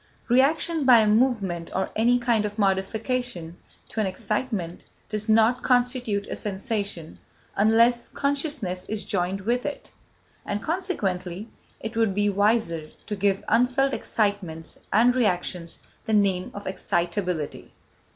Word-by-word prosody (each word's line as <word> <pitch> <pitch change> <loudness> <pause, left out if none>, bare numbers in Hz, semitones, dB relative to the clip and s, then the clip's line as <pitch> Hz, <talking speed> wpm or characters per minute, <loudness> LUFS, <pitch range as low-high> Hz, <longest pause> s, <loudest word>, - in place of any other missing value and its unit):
Reaction, 300 +5 +3
by 250 -3 +7
a 215 - +2
movement 210 -7 +1
or 190 - -1
any 235 +3 +4
kind 235 -3 +1
of 210 0 -4
modification, 200 -1 -1 0.3
to - - -5
an 210 - +1
excitement, 190 -2 -3 0.3
does 215 0 -2
not 225 +3 +4
constitute 245 -5 +1
a - - -5
sensation 200 -5 -4 0.4
unless 230 +3 +4
consciousness 280 - -1
is 220 -1 -1
joined 190 +1 -1
with 240 +5 0
it, 290 - -6 0.5
and, 205 - -3
consequently, 215 - -2 0.3
it 220 +1 -6
would 225 -4 +1
be 205 0 +2
wiser 200 -6 +1 0.2
to 210 - -3
give 195 0 +1
unfelt 250 +4 +2
excitements 195 -7 -2
and 240 +4 +4
reactions 180 -7 -1 0.3
the 220 - -1
name 195 -3 +2
of 200 - -7
excitability. 175 -3 -2
210 Hz, 130 wpm, -25 LUFS, 190-245 Hz, 0.5 s, by